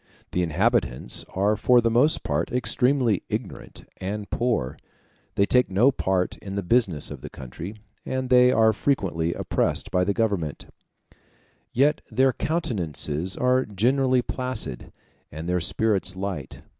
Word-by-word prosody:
The 90 - 0
inhabitants 75 -7 +1
are 100 +3 +2
for 125 +3 +4
the 115 -1 +1
most 140 +8 +3
part 75 +3 -1
extremely 125 -3 +1
ignorant - - -6
and 100 +2 -5
poor; 115 - -1 0.6
they 100 - +3
take 125 +4 +3
no 110 +9 +4
part 95 -7 -1
in 95 -1 -7
the 100 - -2
business 95 -6 +1
of - - -8
the - - -8
country, 80 - -8 0.3
and 130 -1 -3
they 125 0 +6
are 110 -3 +4
frequently 90 -10 -1
oppressed - - -1
by 90 - +2
the 100 +1 0
government; 100 -10 -1 1.1
yet 145 +5 +2
their 130 +3 +2
countenances 90 - -2
are 125 +1 +2
generally 125 +5 +1
placid, 125 - -4 0.4
and 80 +3 -7
their 90 0 0
spirits 95 +1 +1
light. 95 -8 -5
105 Hz, 140 wpm, -24 LUFS, 90-125 Hz, 1.1 s, they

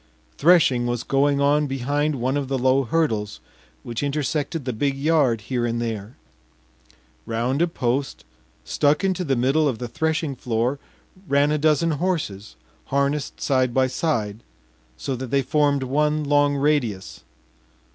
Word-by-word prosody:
Threshing 140 -7 +4
was 120 -1 -2
going 140 +1 +2
on 145 +1 +2
behind 140 +3 -1
one 130 +2 -1
of 145 -2 -2
the 135 0 -1
low 130 +1 +2
hurdles 110 -7 -1 0.4
which 115 -1 -4
intersected 145 +1 -2
the 125 - -2
big 135 +4 -1
yard 140 -6 +2
here 120 +3 -2
and 120 0 -1
there. 115 -1 -5 1.1
Round 120 +6 -1
a 170 - +3
post 135 -3 -2 0.4
stuck 150 +5 +1
into 190 -1 0
the 140 -5 0
middle 135 +5 +2
of 130 -5 -1
the 120 - -5
threshing 160 +3 -1
floor 120 +3 -1 0.5
ran 140 +1 +3
a 150 - +1
dozen 155 +2 +2
horses 145 - -3 0.3
harnessed 140 +1 -1
side 130 -3 +1
by 130 0 +4
side, 115 -7 -2 0.6
so 130 - -3
that 130 0 -6
they 135 +2 +1
formed 145 0 +1
one 150 +3 +1
long 145 0 +2
radius. 135 -9 -1
140 Hz, 145 wpm, -23 LUFS, 120-150 Hz, 1.1 s, Threshing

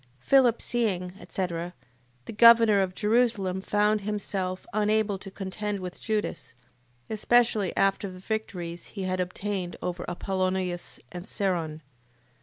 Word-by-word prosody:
Philip 245 - +4
seeing, 190 -7 0
etc... 175 -1 -4 0.5
The - - -7
governor 230 -2 +7
of 185 -1 -2
Jerusalem 210 -4 +1
found 210 +1 +2
himself 195 -3 -3
unable 210 -1 +1
to 195 - -9
contend 200 +2 -4
with 180 -1 -7
Judas, 215 - -3 0.5
especially 220 -2 +2
after 195 +1 +2
the 185 - -10
victories 185 -4 -4
he 195 - -2
had 185 0 -1
obtained 185 0 -3
over 180 0 -4
Apollonius 185 -1 -2
and 180 +2 -7
Seron. 170 -8 -1
195 Hz, 120 wpm, -27 LUFS, 180-215 Hz, 0.5 s, governor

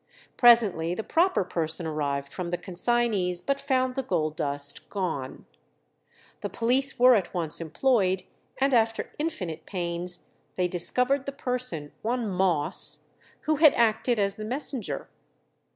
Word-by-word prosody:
Presently 210 -9 +4
the 220 - -4
proper 350 - +2
person 165 -1 -3
arrived 140 -3 -3
from 180 -2 -4
the 175 - -2
consignees, 190 0 0
but 275 +9 -2
found 260 -2 0
the 270 - -2
gold 160 -10 -1
dust 140 -1 -1
gone. 160 -10 -4 0.9
The - - -4
police 260 +4 +1
were 250 0 +7
at 195 -5 0
once 165 -2 0
employed, 185 - +1 0.4
and 270 0 +2
after 225 -1 +1
infinite 180 - -4
pains 175 -1 -3 0.3
they 180 -1 +1
discovered 250 +10 0
the - - -2
person, 250 - -4
one 235 +1 -1
Moss, 180 -6 +2 0.3
who 310 -1 0
had 305 -1 +6
acted 235 +1 +2
as 200 -1 0
the 215 - -6
messenger. 235 - -1
200 Hz, 135 wpm, -26 LUFS, 170-250 Hz, 0.9 s, were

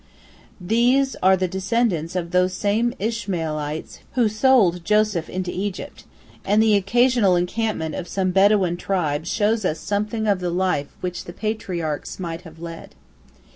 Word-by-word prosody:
These 245 +8 +2
are 190 +1 +5
the 185 0 0
descendants 190 -3 -1
of 170 -2 -3
those 180 0 +2
same 225 +5 0
Ishmaelites 165 -9 -3 0.2
who 240 -4 +3
sold 215 -6 +3
Joseph 210 -4 +1
into 185 -1 -3
Egypt, 195 +1 -5 0.4
and 205 +2 +2
the 220 -2 +4
occasional 215 0 +3
encampment 180 -2 -1
of 180 - -5
some 185 0 -1
Bedouin 195 -2 +3
tribe 165 -5 -1
shows 215 +2 +1
us 165 -4 0
something 210 +2 -2
of 200 -3 +2
the 180 -1 -2
life 175 -5 0
which 180 -1 -4
the 175 - -8
patriarchs 180 -9 -3
might 170 -2 -5
have 165 -3 -13
led. 165 0 -9
190 Hz, 145 wpm, -22 LUFS, 175-215 Hz, 0.4 s, are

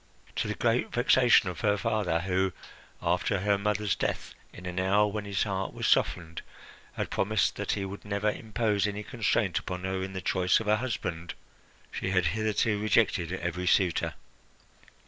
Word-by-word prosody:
To - - 0
the 105 - -2
great 120 +1 +1
vexation 120 -3 +4
of 90 -3 -5
her 105 -1 +2
father 95 -5 0
who, 95 +1 0 0.5
after 100 - +1
her 100 0 +3
mother's 105 0 0
death, - - -3 0.2
in 90 - -11
an 90 0 -3
hour 100 +3 +3
when 105 0 -3
his 100 -1 0
heart 95 -2 -3
was - - -3
softened, 80 -2 +1 0.5
had - - -4
promised 100 -4 +1
that - - -1
he 100 -1 -2
would 95 +1 -7
never 105 +1 0
impose 105 -2 0
any 105 +1 -4
constraint 110 -5 0
upon 90 0 -6
her 95 0 -2
in 95 0 -5
the 95 - -3
choice 90 +1 +2
of 110 - -6
a 105 +1 +4
husband, 90 -8 -4 0.6
she - - -3
had 95 -2 +2
hitherto 110 0 +1
rejected 105 -6 +2
every 90 -1 -3
suitor. 90 -3 +2
100 Hz, 170 wpm, -28 LUFS, 95-105 Hz, 0.6 s, vexation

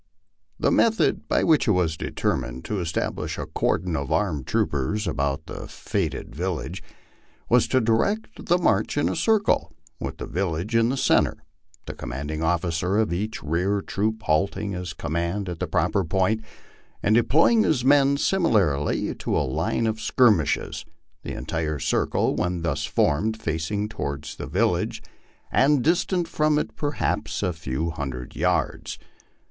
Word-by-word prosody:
The - - +2
method 225 -1 +2
by - - +2
which 155 -5 +3
it 105 - +5
was 85 -3 +1
determined 65 -4 -2
to 105 - -2
establish 85 -2 -2
a - - -3
cordon 90 -3 -1
of 70 -2 -3
armed 80 -11 0
troopers 75 +10 0
about 70 0 -1
the - - -7
fated - - -3
village, 90 0 -3 0.7
was 125 0 +4
to 130 - +3
direct 130 - 0
the 175 - +4
march 110 - +1
in 145 - +2
a - - -1
circle, 220 -2 +2 0.3
with - - -5
the - - -5
village 90 +4 -2
in 115 0 +4
the 135 - -1
centre, - - +2 0.4
the - - -6
commanding 75 +5 -5
officer 85 +3 0
of 110 -6 +1
each 105 +5 -3
rear 90 +6 0
troop 110 +3 -2
halting 95 +6 0
his 90 -3 -4
command 85 +6 -2
at 85 -2 -5
the - - -2
proper 100 - +1
point, 95 +6 +1 0.6
and 105 - +3
deploying 155 - +4
his 135 - +1
men 140 0 +5
similarly 105 - +1
to - - -2
a - - +1
line 65 - -1
of 110 0 -1
skirmishers 110 - +2 0.4
the - - -6
entire 75 -2 -2
circle, 65 - +1
when 90 -1 -1
thus 80 -4 -1
formed, 110 +10 +1
facing 100 +3 -2
toward 70 -9 -4
the - - -7
village, - - 0 0.5
and 140 -2 +4
distant 175 +2 +1
from 150 -1 +2
it - - -2
perhaps 90 - -2
a 90 -2 0
few 80 +1 -3
hundred 65 -5 -6
yards. - - -1
95 Hz, 150 wpm, -24 LUFS, 80-115 Hz, 0.7 s, it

